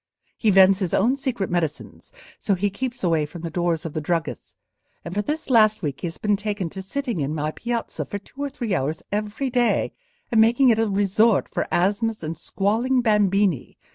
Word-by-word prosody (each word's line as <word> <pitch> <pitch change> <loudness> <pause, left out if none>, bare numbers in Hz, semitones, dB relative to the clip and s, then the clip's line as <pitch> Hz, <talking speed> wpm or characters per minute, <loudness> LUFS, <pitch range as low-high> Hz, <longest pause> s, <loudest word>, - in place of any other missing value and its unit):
He 220 - +1
vends 190 0 +6
his 185 -4 -1
own 235 +7 +3
secret 255 -8 -2
medicines, 165 -4 -3 0.3
so 200 - +1
he 200 +2 -1
keeps 245 +3 -5
away 165 -4 +2
from 165 +2 -10
the 165 - -4
doors 170 -1 -1
of 160 - -5
the 155 - -2
druggists; 165 +1 -3 0.5
and 170 - -5
for 205 - 0
this 300 +9 -3
last 215 -5 +4
week 140 -3 -3
he - - -2
has 165 - -7 0.2
taken 205 -4 -3
to 190 - -6
sitting 240 - -3
in 145 +2 -2
my 155 0 -1
piazza 235 +5 -3
for 205 - -5
two 235 +7 -12
or 285 - -1
three 240 -7 -3
hours 155 -1 -1
every 210 +6 -2
day, 245 -1 +1 0.4
and 225 -2 +5
making 240 +4 +5
it 225 -2 +3
a 225 - +2
resort 205 +2 +2
for - - -3
asthmas 210 +3 0
and 160 +1 -3
squalling 230 +9 0
bambini. 200 - +1
205 Hz, 200 wpm, -23 LUFS, 175-230 Hz, 0.5 s, vends